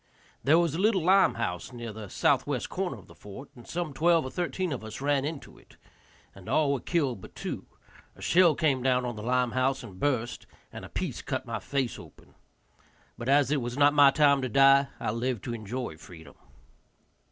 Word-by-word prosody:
There 150 +4 +5
was 170 -3 +1
a 165 - -3
little 200 -3 +2
lime 195 +3 +4
house 90 -5 -4
near 120 -3 -7
the 105 -2 -9
southwest - - 0
corner - - -3
of - - -15
the - - -16
fort, 105 +8 -11
and 120 -2 -14
some 170 -4 -4
twelve 165 0 +3
or 130 - -6
thirteen 180 0 -2
of 125 - -6
us 110 0 -8
ran 140 -1 +1
into 155 -1 -7
it, - - -22 0.6
and 100 -2 -12
all 145 -3 +2
were 140 - -1
killed 135 - -1
but - - -13
two; - - -6 0.5
a - - -16
shell 175 -3 +4
came 140 -5 +1
down 125 -1 +1
on 120 -2 -4
the 105 - -7
lime 125 +1 +1
house 130 +1 0
and 95 -2 -11
burst, 125 -5 -2 0.3
and - - -8
a - - -9
piece - - -4
cut - - -4
my - - -4
face 135 -4 -2
open. - - -16 0.8
But 120 - -5
as 140 -1 +4
it 145 -3 +1
was 120 +2 -5
not 145 0 +5
my 145 -1 +7
time 140 -1 +3
to 130 - -2
die, 135 +3 +5
I - - -2
lived 120 0 -2
to 120 - -4
enjoy 115 -4 -5
freedom. 80 -4 -13
135 Hz, 210 wpm, -28 LUFS, 120-150 Hz, 0.8 s, my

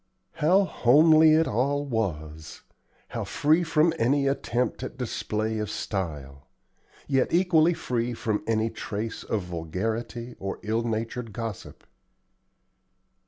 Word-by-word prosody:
How 185 +6 +4
homely 155 +1 +5
it 160 +1 +3
all 140 +6 0
was! 80 - -4 0.5
how - - -4
free 155 +4 +2
from 160 0 +3
any 140 +4 +2
attempt 125 -4 -1
at 130 - -6
display 110 -3 -2
of 105 -1 -3
style! 75 -11 -5 0.6
yet 135 -2 +1
equally 170 -1 +4
free 120 -3 -2
from 110 -2 -1
any 110 0 +1
trace 110 +1 -5
of 105 -4 -2
vulgarity 110 +8 -4
or 95 0 -4
ill 110 +2 0
natured 115 0 -3
gossip. 115 -2 -6
115 Hz, 120 wpm, -26 LUFS, 105-145 Hz, 0.6 s, homely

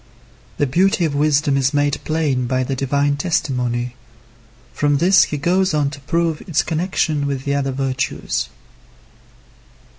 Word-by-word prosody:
The 145 - +2
beauty 175 +6 +2
of 155 - -1
wisdom 145 0 +2
is 135 +1 +1
made 145 -1 +1
plain 145 -6 0
by 130 +1 0
the 135 +1 -2
divine 140 +2 0
testimony. 125 -6 -1 0.8
From 145 -1 +1
this 185 +6 +5
he 150 - -4
goes 180 +3 +1
on 145 -2 +1
to 140 - -9
prove 165 +2 -1
its 170 -2 0
connection 160 -3 -1
with 135 -2 -3
the 140 - 0
other 140 -1 0
virtues. 130 -1 -2
145 Hz, 145 wpm, -19 LUFS, 135-160 Hz, 0.8 s, this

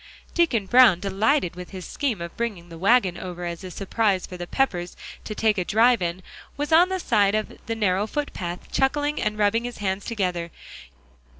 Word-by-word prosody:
Deacon 270 - +2
Brown, 240 -4 +6
delighted 200 - +1
with 180 0 -8
his 185 -2 -8
scheme 250 -11 -2
of 170 0 -7
bringing 205 -7 -4
the 165 - -10
wagon 195 -2 +3
over 180 -1 -6
as 170 0 -5
a 185 - -6
surprise 195 +1 0
for 180 - -9
the 175 -1 -6
Peppers 180 -10 -1 0.3
to 215 - -6
take 215 -2 +2
a - - +1
drive 230 +4 +3
in, 175 +1 -3 0.3
was 290 +2 -3
on 345 +3 +6
the 375 0 -2
side 205 - +2
of 215 0 -2
the 225 - -1
narrow 205 -1 +1
foot 295 +5 -3
path, 175 -1 -6
chuckling 290 +2 0
and 210 0 -1
rubbing 210 +2 +2
his 245 0 -6
hands 195 -1 -2
together. 180 -7 -2
205 Hz, 195 wpm, -24 LUFS, 180-240 Hz, 0.3 s, Brown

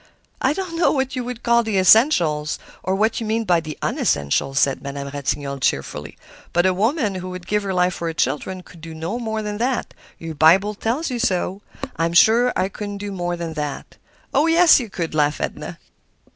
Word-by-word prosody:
"I 265 - +2
don't 360 -1 -5
know 330 - +3
what 265 -1 -1
you 250 - -2
would 245 -1 -6
call 235 0 +4
the 220 -3 -1
essential, 185 - +4 0.3
or 190 +1 -1
what 215 +3 +1
you 225 - -3
mean 225 +1 0
by 180 -5 +3
the 155 -2 -7
unessential," 70 - 0
said 135 -1 +2
Madame 140 0 -6
Ratignolle, 140 0 -3
cheerfully; 75 - -2 0.4
"but 175 +1 +3
a 185 - +3
woman 220 - 0
who 185 0 -5
would 180 -1 -8
give 210 +2 0
her 200 -1 -3
life 180 0 +2
for 170 - -4
her 165 - -2
children 185 +4 -2
could 170 -2 -16
do 165 0 -9
no 165 +9 -4
more 220 -2 -3
than 210 0 -4
that—your 235 -9 -4
Bible 175 +7 +4
tells 245 +9 -2
you 245 - -3
so. 190 -3 -1 0.4
I'm 165 +1 0
sure 230 +8 +5
I 185 - +1
couldn't 205 +1 -6
do 205 0 -5
more 175 -2 -3
than 170 -1 -5
that." 150 -2 -5 0.4
"Oh, 285 +4 +3
yes 330 -1 +6
you 235 -4 -5
could!" 170 -4 -4
laughed 150 -1 +1
Edna. - - -5
190 Hz, 200 wpm, -21 LUFS, 160-230 Hz, 0.4 s, yes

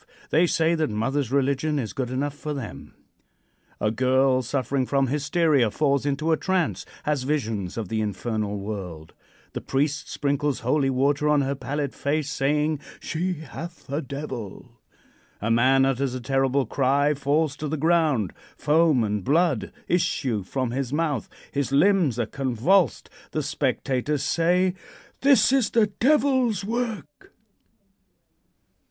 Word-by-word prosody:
They 170 +3 +4
say 165 0 +2
that 160 -4 0
mother's 125 +4 -1
religion 140 +2 +1
is 120 -6 -3
good 130 -3 -3
enough 135 +3 -2
for 150 0 -5
them. 130 -6 -8 0.8
A 105 - +1
girl 130 +2 +2
suffering 130 +1 -1
from 135 -1 +2
hysteria 145 -2 +2
falls 140 +3 +1
into 150 +3 0
a 160 - +3
trance 185 -2 -1 0.2
has 150 -3 0
visions 115 -10 -2
of 110 -4 -3
the 110 -1 -1
infernal 105 0 -2
world. 95 -6 -6 0.4
The - - -4
priest 145 +2 -1
sprinkles 145 -1 -1
holy 135 +3 +1
water 140 +3 +1
on 150 -1 +4
her 135 0 0
pallid 140 0 -3
face, 150 +1 -1
saying: 150 +2 0 0.2
"She 180 +3 -2
hath 165 +4 -9
a 145 +3 -1
devil." 130 - -7 0.6
A 115 +2 -1
man 130 +3 +4
utters 135 -1 0
a - - -3
terrible 135 +1 +1
cry; 140 +4 +2
falls 145 +1 0
to 155 - -4
the 155 +2 -2
ground; 155 - +2 0.2
foam 155 -4 +3
and 105 -2 -2
blood 150 - +1 0.2
issue 145 - 0
from 125 +5 -3
his 130 0 -3
mouth; 150 -4 -1 0.2
his 140 -1 -2
limbs 160 - +3
are 120 - 0
convulsed. 135 - +1 0.3
The - - -1
spectators 135 +2 -1
say: 175 +5 +2 0.5
"This 275 -2 +5
is 265 -4 +3
the 230 -2 +3
Devil's 260 -6 +2
work." 220 -9 -4
140 Hz, 140 wpm, -25 LUFS, 130-155 Hz, 0.8 s, This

